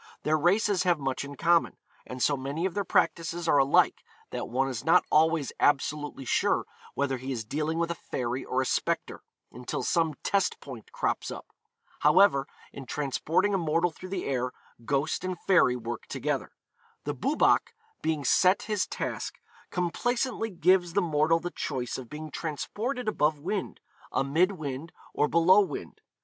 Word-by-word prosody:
Their 155 - +2
races 190 +5 +2
have 180 -3 +3
much 135 -2 -2
in 140 0 -8
common, 170 +4 +2 0.3
and 125 0 -4
so 145 - +3
many 140 +6 -3
of 190 - -1
their 200 - -1
practices 170 -1 0
are 145 - +5
alike 135 +1 +3 0.3
that - - -4
one 130 +3 +1
is 125 -4 -4
not 170 +3 +4
always 160 -2 +3
absolutely 145 -1 0
sure - - +1 0.3
whether 135 -1 0
he 130 +2 -5
is 115 -4 -3
dealing 155 +7 -2
with 170 0 0
a 170 - -7
fairy 125 +1 -2
or 130 +1 0
a - - -5
spectre, - - -1 0.3
until 125 +1 -5
some 165 -3 +1
test 200 -2 +1
point 125 -6 -10
crops - - -1
up. - - -7 0.5
However, 150 -3 +5 0.3
in 135 -2 -9
transporting 160 +9 0
a 195 - +2
mortal 165 +1 +1
through 185 +3 -10
the 190 -1 -3
air, 125 -2 -1 0.3
ghost 140 +6 0
and 185 -2 -3
fairy 180 -10 +4
work 120 -1 -6
together. - - -2 0.5
The 145 - -2
Boobach 275 - +2 0.3
being 155 -2 -1
set 185 +8 +4
his 210 -2 -1
task, - - -4 0.3
complaisantly 225 +6 -1
gives 180 -1 +2
the 200 0 +2
mortal 160 0 +2
the 175 +1 -5
choice 130 -3 -3
of 125 -3 -10
being 155 0 -7
transported 220 - -4
above 155 -7 +2
wind, 190 +6 -4 0.3
amid 165 +8 +2
wind, 150 -1 -6 0.2
or 150 - +2
below 170 +5 +5
wind. 195 - -5
155 Hz, 165 wpm, -28 LUFS, 135-180 Hz, 0.5 s, are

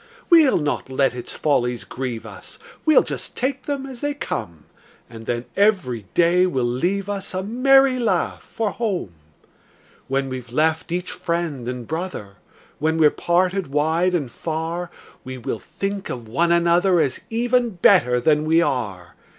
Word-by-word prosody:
We'll 320 -6 +6
not 150 -3 -2
let 135 0 +1
its 125 -1 -5
follies 125 -5 0
grieve 125 -3 -5
us, - - -11 0.3
We'll 310 - +6
just - - -6
take 265 +1 -2
them 280 -2 -2
as 260 -3 -9
they 290 0 -1
come; 85 - -5 0.4
And 115 -1 -11
then 120 0 -2
every 175 - +1
day 175 +2 +4
will 130 -8 0
leave 180 +12 -1
us 200 -2 -4
A 185 - -1
merry 260 +4 +4
laugh 235 - 0
for 220 -3 -3
home. 195 - -3 0.9
When 135 0 0
we've 130 -2 -7
left 160 +4 0
each 180 +1 -2
friend 165 -7 -3
and 125 -2 -5
brother, 160 - -5 0.4
When 160 +2 +1
we're 155 -2 +5
parted 185 +1 0
wide 160 +6 +1
and 140 -8 -2
far, 165 +4 -4 0.3
We 130 0 -7
will 115 -2 -4
think 200 0 -5
of 120 -3 -6
one 170 +10 +1
another, 170 +1 +3
As 140 -5 0
even 240 +1 +1
better 175 - +4
than 150 +4 +2
we 160 +1 +4
are. 105 - -2
165 Hz, 160 wpm, -22 LUFS, 130-195 Hz, 0.9 s, We'll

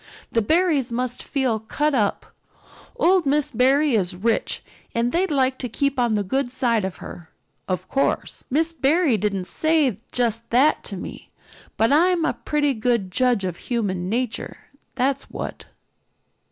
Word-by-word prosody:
The 230 - +2
Barrys 310 - +2
must 250 +1 -2
feel 260 -6 -1
cut 295 +7 -1
up. 210 -6 -1 0.6
Old 360 -3 +3
Miss 295 +1 +2
Barry 270 +4 +3
is 185 -5 0
rich 225 +5 -1 0.3
and 235 +1 +1
they'd 370 +5 +1
like 260 -3 +1
to 250 - -3
keep 280 +3 -1
on 240 -3 +2
the 205 - 0
good 255 +6 -1
side 240 -4 +1
of 190 -1 -3
her. 170 -2 -10 0.4
Of 185 0 -3
course, 275 - -1
Mrs. 320 +3 +1
Barry 295 -1 +3
didn't 200 -2 -1
say 310 - +2 0.2
just 230 -2 -1
that 270 +6 +3
to - - -3
me, - - -9 0.5
but 225 +3 +3
I'm 340 +3 +3
a - - +1
pretty 295 -2 0
good 220 -5 0
judge 245 -1 +2
of 180 -2 -3
human 190 -7 -2
nature, 240 +1 -2 0.4
that's 265 +1 -1
what." - - -6
250 Hz, 155 wpm, -23 LUFS, 220-290 Hz, 0.6 s, Old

